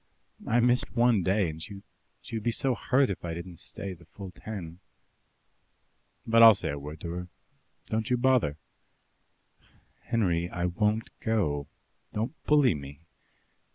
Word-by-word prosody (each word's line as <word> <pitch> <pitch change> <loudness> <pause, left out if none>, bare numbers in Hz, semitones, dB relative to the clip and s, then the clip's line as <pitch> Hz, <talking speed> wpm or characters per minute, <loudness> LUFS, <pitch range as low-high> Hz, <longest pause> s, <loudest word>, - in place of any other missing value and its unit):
I 115 - +3
missed 125 +1 +2
one 120 -3 +4
day, 95 +1 +2
and 80 +1 -10
she 100 +3 -8 0.5
would 110 - -2
be 120 - 0
so 130 +3 +1
hurt 130 0 +2
if 95 - -6
I 85 -1 -3
didn't 85 0 -8
stay 100 -1 -6
the 85 -1 -16
full 95 +3 -9
ten." 90 -5 -8 1.5
"But 115 0 +5
I'll 115 -2 +10
say - - -3
a 70 0 -3
word 75 +2 -8
to 85 - -4
her. 90 +1 -5 0.6
Don't 110 0 -2
you 125 - +3
bother." 120 - +2 1.5
"Henry, 90 -8 +1
I 90 0 -2
won't 105 +5 0
go. 75 -11 0 0.5
Don't 110 +6 -2
bully 145 -6 +5
me." 70 0 -9
100 Hz, 150 wpm, -28 LUFS, 85-115 Hz, 1.5 s, I'll